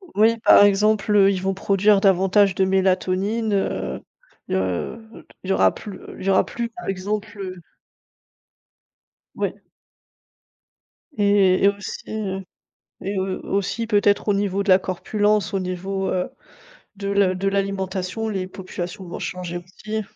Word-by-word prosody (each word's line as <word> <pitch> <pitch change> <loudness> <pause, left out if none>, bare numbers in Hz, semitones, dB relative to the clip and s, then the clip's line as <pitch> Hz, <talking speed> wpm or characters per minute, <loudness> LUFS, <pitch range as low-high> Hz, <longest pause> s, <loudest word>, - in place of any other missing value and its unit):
Oui, 225 +2 +4
par 205 - +7
exemple, 210 +1 +3
ils 190 -2 -1
vont 190 0 0
produire 195 +1 +3
davantage 195 0 +4
de 190 - +2
mélatonine, 190 +3 +1
heu 65 - -2 0.5
heu, 95 - -3 0.2
il 190 - -7
y - - +3
aura - - +4
plus 200 -3 -9 0.2
il - - -7
y - - +1
aura 190 - +4
plus, 235 -1 -4
par 235 +1 -10
exemple, 205 +2 -3
heu 185 -2 -6 1.7
Oui. - - -1 1.6
Et 200 -2 +4
et - - +7
aussi, 200 0 -5
heu, 195 -3 -3 0.6
et 195 0 -2
au 190 - 0 0.3
aussi, 225 +4 -1
peut-être, 205 -1 +2
au - - +5
niveau 200 0 0
de 200 - -9
la 185 0 +7
corpulence, 205 +2 0
au - - +2
niveau, 190 +1 -3
heu, 180 -1 -1 0.7
de 200 0 -4
la 200 -2 +2
de 195 +2 -2
l'alimentation, 195 +1 -2
les 190 -3 -3
populations 185 -1 -7
vont 175 - -7
changer 180 -1 -4
aussi. 215 +5 -6
195 Hz, 145 wpm, -22 LUFS, 185-205 Hz, 1.7 s, par